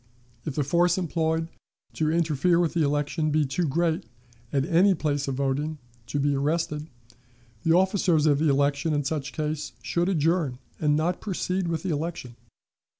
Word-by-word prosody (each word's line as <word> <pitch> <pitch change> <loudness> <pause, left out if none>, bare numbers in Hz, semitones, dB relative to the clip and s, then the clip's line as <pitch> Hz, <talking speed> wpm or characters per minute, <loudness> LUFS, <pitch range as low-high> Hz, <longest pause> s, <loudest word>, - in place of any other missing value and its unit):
If 150 - -4
the 150 - +1
force 175 +5 +2
employed 160 -2 0 0.5
to 155 -1 0
interfere 165 +1 +2
with 170 -2 +1
the 170 - +1
election 150 +2 0
be 150 0 +2
too 155 +5 -1
great, 165 +3 0 0.5
at 135 -1 +1
any 185 +3 +4
place 145 -3 -1
of 135 - -1
voting, 140 +3 -1 0.3
to 145 - -2
be 145 +1 +2
arrested, 150 +2 -1 0.7
the 165 - +3
officers 185 -4 +3
of 145 -1 +3
election, 145 +1 +2
in 145 - 0
such 145 0 -3
case, 155 -1 -3
should 175 +2 0
adjourn 165 -5 +1 0.2
and 150 -1 +2
not 170 +4 0
proceed 185 -2 -2
with 165 -1 -2
the 190 - -1
election. 150 -5 -4
155 Hz, 160 wpm, -26 LUFS, 145-170 Hz, 0.7 s, any